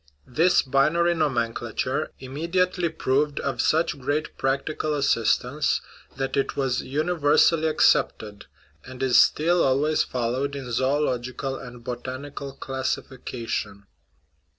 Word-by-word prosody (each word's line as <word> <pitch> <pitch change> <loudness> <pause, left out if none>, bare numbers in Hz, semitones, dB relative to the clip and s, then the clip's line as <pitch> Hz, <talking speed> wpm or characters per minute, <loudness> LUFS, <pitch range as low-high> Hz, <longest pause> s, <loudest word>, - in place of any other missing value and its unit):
This 165 +8 +3
binary 155 +6 +2
nomenclature 120 -8 -1
imme 145 +6 -6
diately 180 -1 +1
proved 145 +3 +1
of - - -1
such 160 -2 +1
great 145 +4 -2
practical 150 +3 -1
assistance 140 +1 +1 0.4
that 135 0 -2
it 140 - 0
was 135 -2 0
universally 155 +1 +2
accepted, 105 -8 +1 0.4
and 130 0 -7
is 130 -2 +6
still 170 +3 +3
always 145 +4 +2
followed 130 +3 -2
in 130 -3 -6
zoological 130 0 -1
and 125 -2 -10
botanical 135 +3 -6
classification. 125 -6 -4
135 Hz, 105 wpm, -25 LUFS, 130-155 Hz, 0.4 s, is